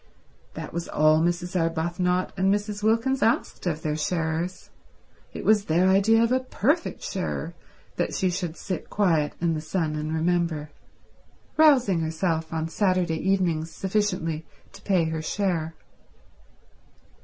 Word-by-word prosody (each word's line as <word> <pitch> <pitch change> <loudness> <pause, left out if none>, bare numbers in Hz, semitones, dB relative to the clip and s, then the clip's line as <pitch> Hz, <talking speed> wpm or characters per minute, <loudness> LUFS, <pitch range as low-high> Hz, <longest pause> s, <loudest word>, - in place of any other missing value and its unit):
That - - -7
was 170 0 -3
all 155 +1 +3
Mrs. 175 +2 -1
Arbuthnot 175 +2 0
and 190 +1 +2
Mrs. 205 0 -2
Wilkins 230 +5 +1
asked 225 -4 0
of 160 -2 -2
their 150 -1 -1
sharers. 165 +2 -2 0.6
It - - -7
was 210 -2 +4
their 175 +4 +3
idea 215 +4 +4
of 230 - +1
a 255 - +3
perfect 275 - -1
sharer - - -3 0.4
that - - -1
she 185 -1 +1
should 175 -2 -4
sit 185 -5 -5
quiet 165 -8 +1
in 170 -1 +1
the 155 - -3
sun 160 -1 -2
and 150 +1 -3
remember, 160 -2 0 0.8
rousing 260 - +5
herself 160 0 -1
on 160 -1 -2
Saturday 180 -2 +1
evenings 170 -5 +1
sufficiently 180 -5 -1 0.3
to - - -13
pay 185 -4 +2
her 160 0 -2
share. 165 -2 -1
175 Hz, 140 wpm, -25 LUFS, 160-195 Hz, 0.8 s, rousing